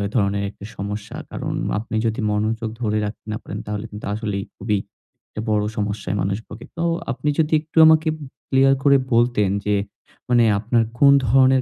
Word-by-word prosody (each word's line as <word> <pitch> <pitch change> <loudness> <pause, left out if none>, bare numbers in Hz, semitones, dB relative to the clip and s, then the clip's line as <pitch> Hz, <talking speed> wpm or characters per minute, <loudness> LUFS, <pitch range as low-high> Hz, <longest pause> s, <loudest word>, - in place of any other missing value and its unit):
ধরনের 100 -2 +1
একটা 100 0 -11
সমস্যা। 100 +1 -5 0.2
কারণ - - -4 0.3
আপনি 110 0 -6
যদি 110 +2 -1
মনোযোগ 110 +2 -1
ধরে 110 -2 0
রাখতে 105 - -7
না 105 - -2
পারেন - - -6
তাহলে 105 +1 -4
কিন্তু 105 0 -8
আসলেই 105 -2 -3
খুবই 105 +1 0 0.5
একটা 105 - -6
বড় 105 -1 +2
সমস্যায় 105 -2 -2
মানুষ 95 +2 0
ভোগে। 110 +2 -10
তো 165 - -1 0.3
আপনি 145 +3 -2
যদি 160 0 +2
একটু 160 +1 -15
আমাকে 160 0 +5
উম 150 - -9 0.2
ক্লিয়ার 135 0 +5
করে 140 -1 +6 0.2
বলতেন 115 -4 +3 0.2
যে 105 - +3 0.5
মানে 120 -1 +5 0.2
আপনার 115 +2 +2 0.2
কোন 140 -1 +7 0.2
ধরনের 130 +2 +5
110 Hz, 175 wpm, -22 LUFS, 105-130 Hz, 0.5 s, কোন